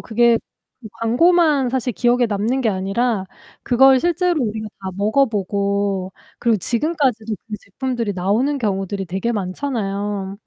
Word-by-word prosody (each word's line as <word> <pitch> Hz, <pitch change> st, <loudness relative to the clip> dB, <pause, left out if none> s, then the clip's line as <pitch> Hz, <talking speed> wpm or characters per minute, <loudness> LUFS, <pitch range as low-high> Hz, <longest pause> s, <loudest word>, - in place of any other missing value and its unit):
그게 235 Hz, +1 st, +3 dB, 0.4 s
그 220 Hz, -, -10 dB
광고만 290 Hz, +2 st, +3 dB, 0.3 s
기억에 245 Hz, 0 st, +3 dB
남는 220 Hz, +5 st, -1 dB
게 230 Hz, -, +1 dB
아니라 195 Hz, +2 st, 0 dB, 0.4 s
그걸 265 Hz, +1 st, +5 dB
실제로 345 Hz, 0 st, +1 dB
우리가 215 Hz, 0 st, -4 dB
다 190 Hz, -1 st, -4 dB
먹어보고 200 Hz, -3 st, 0 dB, 0.3 s
그리고 230 Hz, -2 st, +2 dB
지금까지도 235 Hz, -, 0 dB
그 215 Hz, -, -4 dB
제품들이 235 Hz, 0 st, -3 dB
나오는 220 Hz, +11 st, 0 dB
경우들이 195 Hz, -3 st, -2 dB
되게 195 Hz, +7 st, -2 dB
많잖아요. 200 Hz, -2 st, -3 dB
220 Hz, 310 characters per minute, -20 LUFS, 200-255 Hz, 0.4 s, 그걸